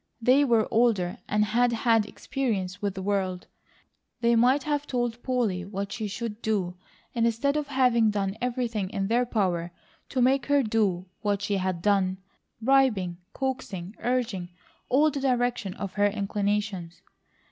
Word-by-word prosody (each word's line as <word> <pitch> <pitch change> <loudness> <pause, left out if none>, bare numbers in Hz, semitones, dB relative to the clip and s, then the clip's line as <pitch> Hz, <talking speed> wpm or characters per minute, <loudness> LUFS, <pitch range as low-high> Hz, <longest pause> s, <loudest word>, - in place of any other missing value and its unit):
They 255 +5 +5
were 230 -5 +3
older 220 -6 +2
and 210 0 +2
had 240 +3 +2
had 225 -2 +2
experience 205 -7 -3
with 200 -1 -1
the 190 - -5
world; 190 -2 -1 0.8
they 235 0 +4
might 255 +4 +4
have 290 -1 -1
told 240 -2 -2
Polly 235 -9 0
what 200 +1 -5
she 220 -1 -3
should 220 +2 -5
do 195 -5 -1 0.4
instead 235 +4 +1
of 300 -1 -1
having 250 -5 +3
done 200 -1 -1
everything 235 -5 -1
in 195 -2 -2
their 240 +2 +2
power 180 -7 0 0.4
to 260 - -2
make 260 0 +3
her 285 -1 +4
do 210 -5 +1 0.2
what 205 -1 0
she 205 -1 0
had 185 -2 -2
done, 195 -2 +2 0.4
bribing, 225 -8 +2 0.2
coaxing, 225 -8 -4
urging, 235 -8 -1 0.4
all 280 +4 +4
in 310 - +2
the 280 - -2
direction 245 -6 0
of 195 -2 -5
her 205 0 +3
inclinations. 200 -3 -2
220 Hz, 155 wpm, -27 LUFS, 195-245 Hz, 0.8 s, They